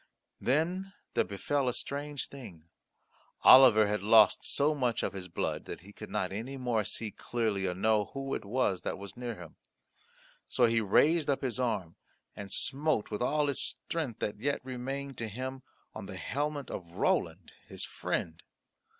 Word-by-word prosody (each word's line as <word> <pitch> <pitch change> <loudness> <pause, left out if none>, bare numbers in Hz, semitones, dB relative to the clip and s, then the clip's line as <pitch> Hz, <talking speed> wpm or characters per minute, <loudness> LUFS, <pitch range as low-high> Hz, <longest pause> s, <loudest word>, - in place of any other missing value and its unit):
Then 175 +8 0 0.2
there - - +3
befell 130 +7 -1
a - - -1
strange 145 +2 -3
thing. 105 - -11 0.8
Oliver 125 -5 +9
had 105 +1 -1
lost 110 +1 +6
so 145 +2 +2
much 125 -6 0
of - - -1
his 95 -2 -6
blood 85 - -3
that - - -7
he 100 +3 -14
could - - -9
not 90 - -1
any 115 +7 -5
more 120 -4 0
see 105 +2 -3
clearly 110 -6 -1
or 90 - -2
know 105 +2 +2
who 135 +3 -5
it - - -3
was 100 -4 0
that - - -3
was 100 0 -9
near 120 -1 -5
him. 90 -4 -12 0.9
So 125 - +4
he 115 -1 +3
raised 150 - +3
up 140 0 0
his 130 -1 -2
arm 105 -9 -1 0.4
and 100 -1 -8
smote 145 -4 0
with 105 - -3
all 150 +4 +2
his 140 -1 0
strength 155 -9 -3
that 105 0 -2
yet 140 +2 -1
remained 135 +1 -5
to 115 - -2
him 130 +5 -5 0.3
on - - -7
the - - -7
helmet 145 0 -3
of 85 -2 -7
Roland - - 0 0.2
his - - -3
friend. 80 -1 -3
120 Hz, 175 wpm, -31 LUFS, 105-140 Hz, 0.9 s, Oliver